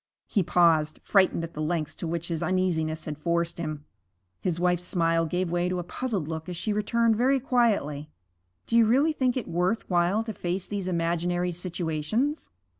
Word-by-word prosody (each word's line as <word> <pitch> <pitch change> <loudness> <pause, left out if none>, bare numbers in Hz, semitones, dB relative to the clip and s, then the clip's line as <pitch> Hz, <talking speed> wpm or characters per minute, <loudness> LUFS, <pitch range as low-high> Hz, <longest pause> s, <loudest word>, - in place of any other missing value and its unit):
He 205 - +1
paused, 165 -3 +3
frightened 190 -4 +3
at 165 0 -6
the 155 - -5
lengths 155 -1 -1
to 170 - -4
which 170 +1 -3
his 165 -2 -2
uneasiness 165 -4 0
had 150 -2 -5
forced 170 +1 -1
him. 155 -3 -4 0.5
His 175 -2 -2
wife's 180 -1 +2
smile 165 -2 +1
gave 180 +1 -1
way 175 +1 +1
to 180 - -1
a 175 - -2
puzzled 200 - -3
look 160 +1 -5
as 175 - -5
she 210 +4 -1
returned 225 +2 +2
very 265 +4 +3
quietly, 205 - +1 0.6
'Do 230 - +1
you 230 - +6
really 280 +7 +3
think 260 -3 +1
it 250 - -3
worth 180 +6 0
while 180 +5 +2
to 225 -1 -5
face 180 0 -3
these 200 -3 -4
imaginary 175 +1 0
situations?' 175 - -2
175 Hz, 185 wpm, -27 LUFS, 165-210 Hz, 0.6 s, you